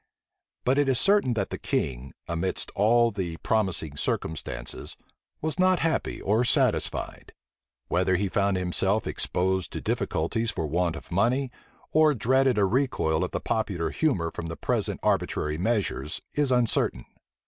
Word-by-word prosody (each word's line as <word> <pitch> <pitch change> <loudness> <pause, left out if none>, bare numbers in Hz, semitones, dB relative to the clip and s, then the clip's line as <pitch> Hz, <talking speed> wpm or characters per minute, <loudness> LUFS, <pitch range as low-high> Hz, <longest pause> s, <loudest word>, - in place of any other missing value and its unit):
But 130 +3 +3
it 145 -2 +2
is 130 -2 +5
certain 195 - +4
that 100 -3 -2
the - - -4
king, 65 0 -2
amidst 85 +2 -2
all 115 +3 +4
these 90 -5 -4
promising 95 -9 0
circumstances, 70 -4 -4 0.4
was 160 +3 -2
not 185 0 +3
happy 165 -1 -1
or 110 +4 +1
satisfied. 120 - 0 0.5
Whether 95 +1 +2
he 100 +3 0
found 100 +1 +1
himself 95 +3 +1
exposed 95 0 -1
to - - -3
difficulties 110 +9 -1
for 80 - -2
want 85 +2 0
of - - -10
money, 125 +8 +1 0.4
or 155 -1 +4
dreaded 130 +2 +2
a 100 - +4
recoil 95 - +1
of - - -2
the - - -3
popular 95 -7 -1
humor 90 - 0
from 85 - -6
the 80 - -6
present - - 0
arbitrary 75 +1 0
measures, 95 - -1
is 145 -3 +1
uncertain. 120 - +1
100 Hz, 150 wpm, -26 LUFS, 85-125 Hz, 0.5 s, is